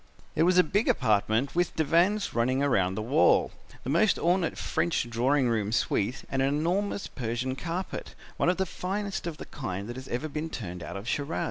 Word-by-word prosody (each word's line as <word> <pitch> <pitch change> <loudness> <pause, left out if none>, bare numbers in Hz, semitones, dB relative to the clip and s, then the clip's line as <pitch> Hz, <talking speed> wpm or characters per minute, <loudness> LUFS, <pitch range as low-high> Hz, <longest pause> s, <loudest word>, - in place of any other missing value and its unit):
"It - - +1
was 180 +2 +4
a 180 - +8
big 205 +7 0
apartment 110 +2 +2
with 175 0 0
divans 175 +7 +2
running 130 +3 +1
round 95 -10 +2
the 110 - -2
wall, 110 -7 +4 0.3
the - - -4
most 190 +7 +3
ornate 175 0 +1
French 170 -7 0
drawing 125 +4 +2
room 110 -3 0
suite 115 +1 0
and 135 - 0
an 135 - +3
enormous 175 +8 0
Persian 125 +1 -3
carpet, 175 +6 -5 0.2
one - - +2
of 180 - +1
the 190 - +1
finest 195 +1 -3
of 165 -3 -5
the - - -8
kind 100 -7 -5
that 120 +1 -6
has 130 0 -8
ever 125 +6 -2
been 155 +2 -4
turned 90 - -6
out 80 - -6
of 100 +4 -8
Shiraz. 145 +4 -1
140 Hz, 200 wpm, -28 LUFS, 115-175 Hz, 0.3 s, a